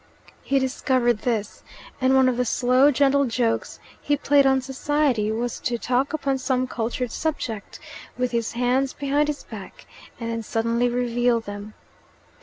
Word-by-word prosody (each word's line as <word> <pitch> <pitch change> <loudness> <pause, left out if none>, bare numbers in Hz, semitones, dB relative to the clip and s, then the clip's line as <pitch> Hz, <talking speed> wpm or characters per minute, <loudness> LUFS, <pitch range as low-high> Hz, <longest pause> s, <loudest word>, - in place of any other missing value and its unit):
He 275 - 0
discovered 255 -3 +1
this, 220 -4 -2 0.4
and 260 +1 +4
one 265 -1 +5
of 255 - +2
the 250 - +2
slow, 255 +3 +3
gentle 280 0 +3
jokes 230 -1 -1 0.2
he 290 - +1
played 280 -1 +4
on 265 0 +4
society 265 -4 0
was 235 +2 -3
to 240 - -1
talk 255 +4 0
upon 275 -3 -1
some 255 -1 0
cultured 245 0 -3
subject 245 -10 -4 0.4
with 250 -1 0
his 230 -2 -1
hands 250 +3 +1
behind 285 +1 0
his 295 -1 -3
back 210 -4 -10 0.3
and 230 -1 -3
then 230 0 -3
suddenly 230 +2 0
reveal 240 -1 +1
them. 205 -1 -8
250 Hz, 155 wpm, -24 LUFS, 230-270 Hz, 0.4 s, one